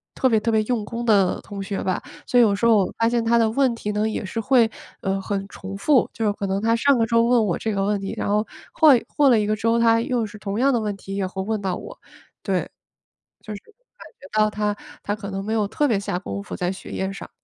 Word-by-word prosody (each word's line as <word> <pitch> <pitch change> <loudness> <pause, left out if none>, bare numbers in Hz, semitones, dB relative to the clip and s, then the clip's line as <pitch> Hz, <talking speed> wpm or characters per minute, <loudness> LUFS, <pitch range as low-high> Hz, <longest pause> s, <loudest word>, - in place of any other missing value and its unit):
特 260 - +2
别 225 -2 +3
特 230 +2 -1
别 220 -1 +3
用 230 -1 -1
功 235 +3 -5
的 200 -5 +3
同 200 -1 -8
学 195 0 -4
吧。 185 -1 -1 0.3
所 245 - +2
以 - - +8
有 210 -3 +3
时 205 - -1
候 230 - +6
我 195 - 0
发 230 - +3
现 235 -1 0
他 235 +1 +3
的 225 -1 +3
问 255 +2 +2
题 210 -2 -4
呢， 210 +1 0
也 220 - -3
是 210 +4 -4
会， 235 0 +3 0.3
呃， 195 0 -1
很 195 0 -3
重 195 -1 -8
复， 260 +5 +3
就 225 - -2
是 205 - +2
可 200 - -4
能 195 +1 -1
他 225 +1 +2
上 275 +3 +3
个 225 - +2
周 230 0 +3
问 235 -1 +3
我 175 - 0
这 220 - -2
个 195 -1 0
问 205 0 0
题， 195 0 -5
然 - - -2
后 210 +2 +1 0.3
换 295 -6 +6 0.2
过 285 -2 +5
了 235 -3 +5
一 210 - 0
个 215 - +1
周， 230 +2 +1
他 230 0 +4
又 240 0 -1
是 210 0 -10
同 205 +1 -4
样 275 +2 +4
的 240 - +2
问 210 -2 -2
题， 195 0 -7
也 200 -1 -1
会 190 +1 -5
问 215 +1 -2
到 190 -2 -1
我， - - -9 0.5
对， - - -1 0.7
就 215 - -8
是 200 - -8
感 - - -19
觉 280 - -13 0.2
到 215 - 0
他 210 0 -1 0.3
他 205 - -1
可 205 -1 -7
能 195 0 -4
没 215 - -3
有 215 -2 +1
特 295 +7 0
别 220 -7 +1
下 200 -3 -3
功 100 - -5
夫 - - -7
在 180 +1 -1
学 190 - -10
业 190 0 -3
上。 195 - -9
215 Hz, 295 characters per minute, -23 LUFS, 200-235 Hz, 0.7 s, 以